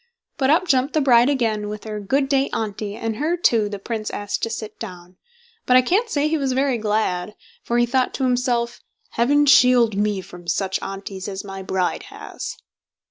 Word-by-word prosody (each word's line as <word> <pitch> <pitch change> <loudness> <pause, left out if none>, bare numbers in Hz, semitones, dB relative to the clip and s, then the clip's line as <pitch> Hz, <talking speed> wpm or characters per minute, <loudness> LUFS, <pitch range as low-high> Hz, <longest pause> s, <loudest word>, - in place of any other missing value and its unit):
But 270 -3 +1
up 350 +5 +3
jumped 270 0 +2
the - - +4
bride 245 -2 +5
again, 220 -6 0
with 210 0 -6
her 215 -1 -5
"Good 270 +8 0
day, 275 0 +1
Auntie", 210 -1 -3
and 225 -1 -3
her, 320 +5 0
too, 225 -10 +2
the 205 - -5
Prince 215 +1 -4
asked 205 0 -4
to 230 - -1
sit 220 -1 -6
down; 180 -4 -9 0.5
but 255 - +6
I 255 - +5
can't 415 - +1
say 295 -6 +1
he 315 0 0
was 270 -2 0
very 265 -2 +1
glad, 210 -2 -1 0.3
for 240 - -1
he 240 - +4
thought 255 +1 +1
to 270 - -2
himself: 245 -2 0 0.3
"Heaven 290 +5 +3
shield 250 -5 +5
me 205 -1 0
from 180 -1 -13
such 190 +1 -1
Aunties 195 -1 -6
as 195 -1 -5
my 195 -1 -7
bride 190 -1 -2
has!" - - -7
230 Hz, 195 wpm, -22 LUFS, 205-265 Hz, 0.5 s, but